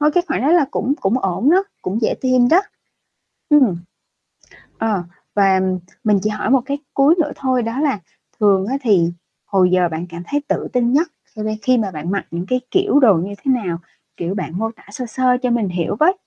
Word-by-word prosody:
thôi 300 +1 +4
cái 355 - +3
khoản - - -1
đó 270 - +1
là 345 -4 +5
cũng 275 - 0
cũng 200 +6 +1
ổn 215 - +1
đó, 370 +3 +5 0.2
cũng 200 +5 -2
dễ - - +2
tìm 255 -2 +3
đó. 340 +7 +5 0.9
Ừm, 270 -10 +5 1.0
ờ, 210 -5 0 0.3
và 195 -2 +4 0.4
mình 210 -2 +4
chỉ 215 - 0
hỏi 210 - -2
một 265 0 +5
cái 280 +1 -3 0.2
cuối 280 +4 +5
nữa 300 - 0
thôi 255 -2 0
đó 230 +4 -3
là 285 -7 +1 0.4
thường 195 -2 +3
á 260 +5 -1
thì 190 -8 +3 0.4
hồi 185 -2 +3
giờ 180 -1 +3
bạn 165 +1 -5
cảm 170 0 -8
thấy 290 +7 -1
tự - - -1
tin 245 -1 +1
nhất 315 +5 +3 0.2
khi 215 - -9
me 215 0 -2
khi 255 -1 +3
mà 210 -4 -1
bạn 160 0 -5
mặc 200 0 -1
những 170 +2 -4
cái 255 0 +1
kiểu 380 -6 +3
đồ 230 -7 +6
như 180 +4 -2
thế 270 - +3
nào? 170 -2 -2 0.4
Kiểu, 175 +2 -3
bạn 180 -3 -4
mô 225 +1 -1
tả - - -19
sơ 245 +4 -5
sơ 250 +2 +1
cho 250 - 0
mình 235 -4 +1
hiểu 175 +1 -2
với. 355 +5 +5
225 Hz, 220 wpm, -19 LUFS, 190-265 Hz, 1.0 s, đồ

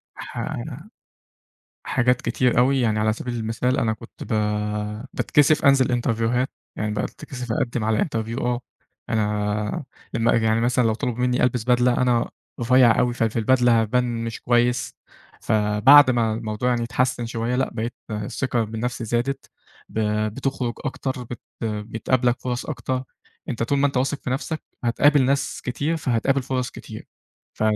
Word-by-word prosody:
حا - - -5 1.2
حاجات 125 +1 +2
كتير 125 -2 +1
أوي، 130 +2 +4
يعني 110 -2 +1
على 110 0 +2
سبيل 120 +2 -5
المثال 115 +3 -1
أنا 110 - +1
كنت 110 +1 -10
ب - - -13 0.8
باتكسف 150 +1 +3
أنزل 135 -2 +5
إنترفيوهات، 120 +1 0 0.3
يعني 105 0 -2
باتكسف 125 +2 -5
أقدم 120 -1 -1
على 110 -1 +1
interview 115 -3 -3
آه، 125 0 0 0.5
أنا 105 +1 -1 0.5
يعني 110 0 +2
مثلًا 120 +1 +2
لو 110 -1 +2
طلبوا 120 +1 -3
مني 125 0 +1
ألبس 125 -2 +1
بدلة 125 0 +3
أنا 120 -2 +2 0.3
رفيع 120 0 +5
أوي، 120 -1 +2
ففي 115 -1 0
البدلة 120 0 +4
هابان 120 +1 0
مش 115 -1 -5
كويس، 120 0 +1 0.5
فبعد 110 +7 +6
ما 115 -3 +1
الموضوع 110 +2 -2
يعني 120 -1 +1
أتحسن 125 0 0
شوية 115 +1 -2
،لأ 130 - 0
بقيت 115 +2 -3 0.2
الثقه 115 +3 -1
بنفسي 115 +2 -4
زادت 120 +5 -2 0.4
ب - - -6 0.4
بتخرُج 135 -3 -2
أكتر، 130 -2 -3 0.4
بتقابلك 115 +3 0
فرص 125 -1 -3
أكتر، 130 -1 -3 0.5
أنت 115 -2 -2
طول 140 +4 +1
ما 145 - +4
أنت 135 - -3
واثق 135 +3 0
في 125 - -4
نفسك، 155 +4 -3 0.2
هتقابل 145 +4 +4
ناس 140 +2 0
كتير؛ 145 +7 -1
فهتقابل 135 0 +1
فرص 125 -1 -2
كتير، - - -10 0.5
ف - - -5
120 Hz, 145 wpm, -23 LUFS, 115-130 Hz, 1.2 s, فبعد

